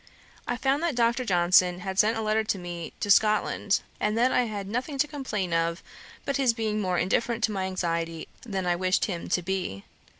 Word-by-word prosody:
I 245 - -1
found 270 +3 +1
that 335 -5 0
Dr. 235 +1 +2
Johnson 180 -2 +3
had 190 +1 -3
sent 220 +2 +4
a 225 - -2
letter 215 +1 +1
to 215 -2 -1
me 175 -2 -6
to 205 - +1
Scotland, 210 -1 +3 0.2
and 210 +1 0
that 250 +2 +3
I 250 - +2
had 205 -3 -5
nothing 250 +7 -3
to 290 +2 +2
complain 215 - -3
of 165 +1 0 0.4
but 280 - 0
his 260 -4 +3
being 215 -2 -1
more 185 -2 0
indifferent 230 +6 0
to 220 - +2
my 190 -2 -2
anxiety 165 -3 -2
than 195 -5 -3
I 175 -1 +2
wished 185 +1 +1
him 175 -5 -5
to 180 - +1
be. 180 - -3
205 Hz, 205 wpm, -27 LUFS, 180-235 Hz, 0.4 s, sent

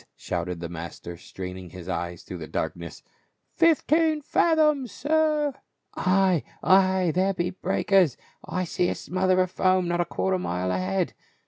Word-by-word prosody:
shouted 90 -1 -4
the 85 - -3
master, 85 +1 -7
straining 90 +1 -8
his 90 0 -10
eyes 85 -1 -4
through 90 - -8
the 80 - -7
darkness. 85 -2 -5 0.3
" - - -48
Fifteen 320 -1 +3
fathoms, 300 -4 +2
sir." 305 -1 +1 0.4
"Ay, 185 -3 +2 0.2
ay, 185 -2 +4
there 190 +2 +1
be 175 +1 -1
breakers! 190 - +2 0.3
I 185 - -2
see 175 +1 0
a - - -2
smother 185 0 0
of 185 -1 -1
foam 185 -1 +2
not 175 0 +1
a - - 0
quarter 190 - -1
of - - -5
a - - -6
mile 90 +1 -1
ahead. 95 +1 -1
180 Hz, 160 wpm, -25 LUFS, -, 0.4 s, ay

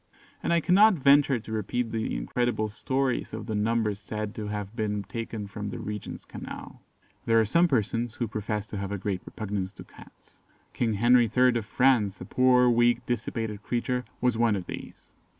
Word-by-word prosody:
And - - -1
I 170 0 +3
cannot 200 +5 +6
venture 140 -3 +4
to 110 - -10
repeat 110 +2 -2
the 110 -1 -2
incredible 110 - -1
stories 130 +4 -1
of 110 -1 -5
the 110 - -4
numbers 105 -1 0
said 105 0 -5
to 105 -1 -5
have 105 0 -5
been 105 -3 -1
taken 115 0 -5
from 100 +1 -6
the - - -5
Regent's 105 -1 -6
Canal. - - -9 0.5
There 115 0 +5
are 110 - +3
some 170 - +4
persons 115 - 0
who 120 - -2
profess 105 -1 -3
to 105 - -5
have 100 0 -4
a 100 - -2
great 95 -1 -3
repugnance 100 -3 -4
to - - -11
Cats. - - -18 0.3
King 115 -3 0
Henry 120 +2 +5
III. 125 -1 +5
of 105 - -9
France, 115 -5 +2
a - - -7
poor, 125 -1 +4
weak, 120 0 +3
dissipated 110 -3 -3
creature, 125 +3 -1 0.2
was 125 -3 +1
one 115 -3 +3
of 95 -3 -4
these. - - -9
110 Hz, 185 wpm, -27 LUFS, 105-125 Hz, 0.5 s, cannot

